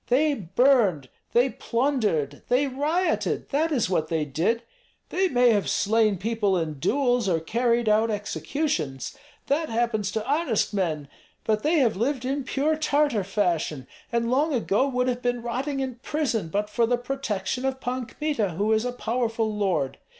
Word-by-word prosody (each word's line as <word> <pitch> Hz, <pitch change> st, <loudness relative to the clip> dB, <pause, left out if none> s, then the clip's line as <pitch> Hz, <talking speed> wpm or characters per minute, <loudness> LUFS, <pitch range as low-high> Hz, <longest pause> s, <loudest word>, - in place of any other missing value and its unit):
They 290 Hz, +5 st, +3 dB
burned, 195 Hz, -, +2 dB, 0.2 s
they 250 Hz, +2 st, +3 dB
plundered, 230 Hz, -, -1 dB
they 255 Hz, +3 st, +3 dB
rioted; 300 Hz, +7 st, -1 dB
that 310 Hz, +3 st, +1 dB
is 255 Hz, -7 st, +1 dB
what 175 Hz, -4 st, 0 dB
they 160 Hz, -1 st, -1 dB
did. 175 Hz, -, 0 dB, 0.5 s
They 380 Hz, +1 st, +1 dB
may 245 Hz, -6 st, +4 dB
have 205 Hz, -3 st, +1 dB
slain 215 Hz, -1 st, +2 dB
people 210 Hz, -1 st, 0 dB
in 155 Hz, -4 st, -3 dB
duels 245 Hz, -, +1 dB
or 165 Hz, -2 st, +2 dB
carried 235 Hz, +6 st, 0 dB
out 215 Hz, +2 st, +3 dB
executions, 210 Hz, -, -2 dB, 0.3 s
that 310 Hz, +3 st, 0 dB
happens 225 Hz, -3 st, 0 dB
to 220 Hz, +1 st, -3 dB
honest 280 Hz, -8 st, +1 dB
men; 160 Hz, -7 st, -1 dB, 0.4 s
but 215 Hz, -1 st, +1 dB
they 320 Hz, +6 st, +2 dB
have 245 Hz, -7 st, +3 dB
lived 250 Hz, +5 st, -1 dB
in 275 Hz, +2 st, -1 dB
pure 285 Hz, +4 st, 0 dB
Tartar 290 Hz, -7 st, +1 dB
fashion, 175 Hz, -8 st, -1 dB, 0.3 s
and 235 Hz, 0 st, 0 dB
long 290 Hz, +3 st, +2 dB
ago 230 Hz, +2 st, +1 dB
would 250 Hz, -2 st, 0 dB
have 250 Hz, -1 st, -1 dB
been 245 Hz, -1 st, -1 dB
rotting 265 Hz, +4 st, -2 dB
in 255 Hz, -3 st, -4 dB
prison 250 Hz, -, -1 dB
but 205 Hz, +6 st, -1 dB
for 230 Hz, +2 st, +1 dB
the 245 Hz, +1 st, +2 dB
protection 245 Hz, -3 st, -3 dB
of 265 Hz, 0 st, -1 dB
Pan 250 Hz, -1 st, -3 dB
Kmita, 235 Hz, -, -2 dB
who 210 Hz, +5 st, +1 dB
is 220 Hz, +2 st, +1 dB
a 250 Hz, -, -1 dB
powerful 230 Hz, -3 st, -1 dB
lord. 175 Hz, -10 st, -1 dB
235 Hz, 165 wpm, -25 LUFS, 205-270 Hz, 0.5 s, may